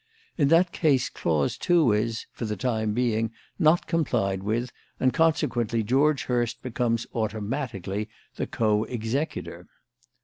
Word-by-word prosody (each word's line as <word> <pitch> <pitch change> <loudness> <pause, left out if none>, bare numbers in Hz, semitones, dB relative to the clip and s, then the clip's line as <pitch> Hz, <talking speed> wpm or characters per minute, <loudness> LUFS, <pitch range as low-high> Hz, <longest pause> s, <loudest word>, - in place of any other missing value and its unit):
In 145 -5 +3
that 165 +4 +4
case 140 -6 +2
clause 75 -4 -1
two 170 -9 +4
is 110 +2 -1
for 115 - -5
the 105 -1 -2
time 110 -1 0
being 115 -2 +1 0.3
not 165 0 +4
complied 120 - 0
with, 115 +5 -1 0.3
and 130 -1 +2
consequently 120 -8 +1
George 140 +6 +2
Hurst 120 -1 -1
becomes, 115 -2 -1
automatically, 110 -2 -3 0.3
the - - -3
co 105 -1 +1
executor. 125 +6 -3
120 Hz, 130 wpm, -26 LUFS, 110-140 Hz, 0.3 s, that